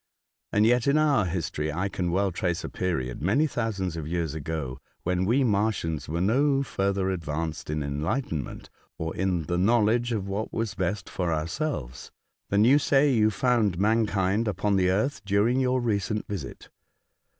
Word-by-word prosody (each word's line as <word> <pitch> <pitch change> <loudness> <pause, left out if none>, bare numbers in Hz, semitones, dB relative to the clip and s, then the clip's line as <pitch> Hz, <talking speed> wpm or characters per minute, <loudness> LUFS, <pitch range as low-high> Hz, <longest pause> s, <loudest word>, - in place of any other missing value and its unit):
And 105 +1 +3
yet, 120 +2 +3
in 140 +2 +4
our 145 -9 +3
history, 80 -3 -2
I 90 +6 -1
can 90 -3 -2
well 95 +2 +1
trace 90 0 -2
a - - -4
period, 65 -10 -2
many 110 - +3
thousands 110 - -2
of 80 -2 -5
years 85 -2 -2
ago, 75 -4 -4 0.2
when 90 +1 0
we 125 +7 +3
Martians 100 - 0
were 85 +2 -2
no 135 +8 +2
further 95 -5 -1
advanced 80 -3 -4
in 75 -1 -1
enlightenment, 75 - -3 0.3
or 80 0 -4
in 90 -3 0
the 85 +3 -1
knowledge 115 +3 +3
of 105 -4 -2
what 100 +3 -3
was 115 -3 -2
best 95 +2 -2
for 90 -2 -2
our 80 -1 0
selves, 85 - -4 0.4
than 100 +2 +4
you 140 +5 +6
say 140 -1 +3
you 110 -2 +4
found 110 -5 +1
mankind 105 0 +1
upon 100 0 0
the 90 -1 +3
earth 105 +7 0
during 105 +6 +2
your 130 0 +2
recent 105 -2 -1
visit. 90 -10 -6
100 Hz, 170 wpm, -26 LUFS, 85-115 Hz, 0.4 s, you